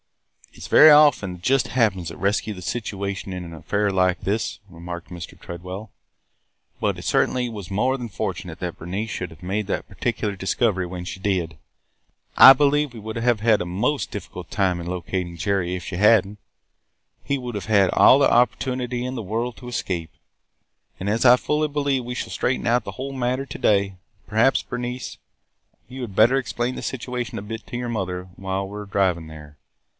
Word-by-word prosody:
"It - - -12
's - - -6
very 155 - +8
often 145 -11 +5
the 90 - -10
'just 135 +8 +1
happeneds' 105 -9 +1
that - - -9
rescue 105 +2 0
the 90 - -9
situation 100 -2 -4
in 90 -1 -5
an 85 - -9
affair 100 +5 -1
like 90 -1 +1
this," 105 +2 -2
remarked 85 0 -8
Mr. 90 0 -9
Tredwell. 90 +5 -8 0.9
"But - - 0
it - - -8
certainly 125 -1 +1
was 100 -5 -8
more 130 +7 +1
than 120 -3 -6
fortunate 95 - -5
that - - -4
Bernice 100 +6 -4
should 90 - -4
have 80 +2 -15
made 100 +3 -2
that - - -3
particular 105 0 -2
discovery 95 0 0
when 90 0 -6
she 95 - -6
did. 90 -6 -1 0.8
I 135 - +11
believe 145 0 +2
we 115 - -9
would 110 +1 -6
have 120 -1 +1
had 110 0 +3
a - - -2
most 110 +12 -1
difficult 90 -3 -8
time 95 -4 +1
in 85 - -7
locating 90 -1 -3
Jerry 90 -1 0
if 90 - -6
she 90 - -5
had 105 +1 +5
n't. 105 +1 -11 0.8
He 140 - -1
would 125 -3 -6
have 100 - -4
had 100 -3 +4
all 135 - +6
the 140 - +5
opportunity 125 0 +1
in 130 +1 -4
the 115 - -4
world 115 +4 -2
to 125 - -11
escape. 90 -8 -3 0.9
And, 95 +2 -2
as 115 +4 +1
I 125 0 +8
fully 150 +3 0
believe 140 -3 0
we 125 +1 -5
shall - - -4
straighten 125 -1 -1
out 120 0 +3
the - - -7
whole 135 +1 -6
matter 130 +1 -1
to - - -8
day, 100 -2 +2 0.3
perhaps, 110 +5 +3
Bernice, 125 +1 -5 0.7
you 130 +2 -8
had 110 -6 -6
better 120 +6 +5
explain 125 -1 -2
the - - -6
situation 125 -1 -4
a 100 - -5
bit 110 +1 -7
to 120 - -5
your 120 0 -3
mother 90 -4 -3
while 95 0 -3
we 100 +2 -8
are 105 - -7
driving 95 -5 0
there. 75 -1 -12
105 Hz, 195 wpm, -23 LUFS, 95-125 Hz, 0.9 s, I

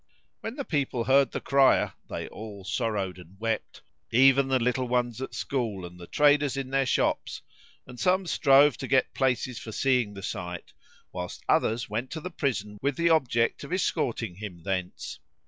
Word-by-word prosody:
When 225 +2 -6
the 280 - -4
people 140 -6 -1
heard 135 +1 +4
the - - -3
crier, 135 -1 +3 0.2
they - - -4
all 105 -2 -9
sorrowed 100 -4 -2
and 90 +2 -15
wept, 115 -1 -3 0.3
even 135 +3 +5
the 135 -1 +3
little 125 +1 0
ones 120 -1 0
at 130 - -5
school 110 -9 -2
and 90 0 -11
the 85 - -10
traders 145 -2 +3
in 135 -1 -4
their 135 -1 +2
shops; - - 0 0.4
and 125 -1 -11
some 185 +1 +2
strove 140 -5 +5
to - - -5
get 130 - +2
places 130 -3 0
for 110 - -8
seeing 125 -3 +1
the 100 - -8
sight, 90 -4 -5 0.4
whilst 90 -1 -6
others 115 +2 +2
went 115 +5 -3
to 160 - -4
the 180 +3 -6
prison 105 - -2
with 140 0 0
the 170 0 +3
object 120 -7 +2
of - - -9
escorting 115 - -1
him 95 -5 -8
thence. 90 -5 -4
125 Hz, 180 wpm, -27 LUFS, 105-135 Hz, 0.4 s, even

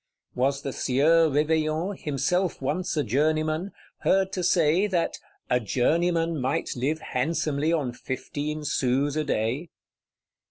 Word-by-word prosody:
Was 135 +2 0
the 135 - -3
Sieur 160 +5 +3
Réveillon, 155 +5 +1
himself 175 +4 -1
once 155 +6 -2
a 150 - +2
journeyman, 155 - 0 0.3
heard 190 0 +2
to 185 - -3
say 170 +3 +3
that 180 -4 -1 0.3
"a 125 - +2
journeyman 165 - +1
might 130 +2 -1
live 140 +6 -1
handsomely 150 +2 -1
on 145 -7 0
fifteen 145 +4 -4
sous 135 +2 +1
a 155 - 0
day?" 135 +4 -1
155 Hz, 125 wpm, -26 LUFS, 135-165 Hz, 0.3 s, Sieur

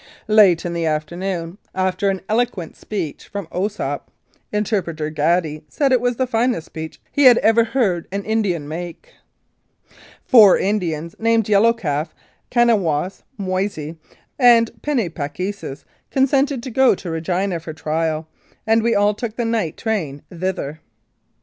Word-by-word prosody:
Late 205 -6 +5
in 175 - -2
the 170 -1 -1
afternoon, 170 +4 -3 0.2
after 185 +1 0
an 190 -1 -2
eloquent 220 -7 -1
speech 180 -9 -5
from 200 -2 -5
Osoup 205 +4 -2 0.5
(Interpreter 185 -7 -1
Gaddy 155 0 0
said 280 -2 +1
it 255 -2 +4
was 245 0 +1
the 260 - 0
finest 240 -6 0
speech 160 0 -8
he 285 - +3
had 245 -2 +9
ever 225 0 +4
heard 220 -8 0
an 200 +1 -3
Indian 200 -9 0
make), 170 +2 -7 1.1
four 215 -6 +7
Indians 170 -5 -1
named 230 -1 +2
Yellow 215 +2 +5
Calf, 160 -9 -3 0.3
Kanawos, 195 -8 +1 0.2
Moise, 185 -5 -2 0.5
and 235 -3 +6
Penni 265 -10 0
pa 145 -4 -3
k 180 +7 -3
sis 170 -9 -9 0.2
consented 270 -1 +1
to 260 - -6
go 260 -2 +4
to 175 -2 -7
Regina 175 +3 -1
for 165 0 -7
trial, 160 0 -2 0.4
and 225 +1 +3
we 230 +1 +1
all 205 +1 +3
took 215 +1 -5
the 235 - -1
night 225 -8 -1
train 165 -11 -3
thither. 165 -4 -3
195 Hz, 145 wpm, -20 LUFS, 165-230 Hz, 1.1 s, had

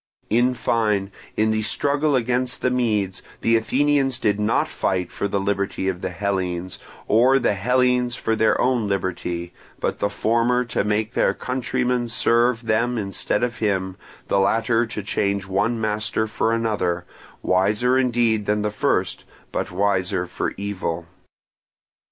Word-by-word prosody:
In 125 +3 +3
fine, 105 -5 0 0.3
in 110 0 +3
the 110 0 0
struggle 145 +6 +1
against 125 +1 0
the 125 - +2
Medes, 105 -7 0 0.2
the 115 - +3
Athenians 135 +3 +2
did 105 -4 0
not 105 +2 +1
fight 90 -2 -1
for 100 - -2
the 100 0 -1
liberty 100 -1 -1
of 95 -1 -2
the - - -2
Hellenes, 90 -1 -3 0.3
or 125 +5 +5
the 125 - +2
Hellenes 125 +3 +2
for 115 -2 -1
their 110 -1 +2
own 125 -4 +1
liberty, 90 -3 -3 0.3
but - - -2
the 100 - +1
former 115 +4 +1
to 115 - -1
make 105 +2 -1
their - - +2
countrymen 125 -1 -1
serve 120 0 +2
them 115 +2 +1
instead 100 +2 -1
of 120 -1 -2
him, 95 -3 -1 0.3
the 100 - +2
latter 115 +3 +2
to 105 -2 -5
change 100 0 -1
one 105 +5 0
master 110 0 -1
for 110 +1 -1
another, 105 -7 -1 0.4
wiser 105 +7 +2
indeed 120 -5 +2
than 105 0 +1
the 105 - -1
first, - - 0 0.3
but - - -2
wiser 95 -1 0
for - - -3
evil. 95 -4 -3
110 Hz, 150 wpm, -22 LUFS, 100-120 Hz, 0.4 s, or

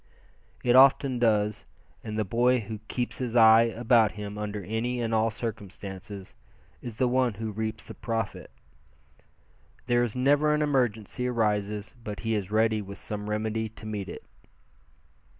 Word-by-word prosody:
It 125 0 +3
often 135 -1 +5
does, 105 -3 +1 0.4
and 110 0 -5
the 110 - 0
boy 120 +5 +2
who 110 0 -7
keeps 125 -1 -3
his 125 -2 -3
eyes 115 0 +6
about 115 -2 +4
him 105 -1 -6
under 105 -1 -4
any 115 +6 -2
and 115 -1 -1
all 110 0 +3
circumstances, 100 -3 -7 0.5
is 115 -3 -8
the 130 - +2
one 125 -3 +1
who 110 +1 -4
reaps 110 +1 -4
the - - -10
profit. 115 0 -4 1.4
There 120 -1 +2
is 120 -2 -1
never 145 +4 +3
an 150 - +1
emergency 125 -4 0
arises 105 -3 -1
but 105 -2 -6
he 115 0 -1
is 100 -3 -2
ready 110 0 +2
with 100 0 -9
some 105 0 -5
remedy 110 +1 -2
to 110 0 -12
meet 105 -3 -4
it. - - -8
110 Hz, 155 wpm, -27 LUFS, 105-120 Hz, 1.4 s, eyes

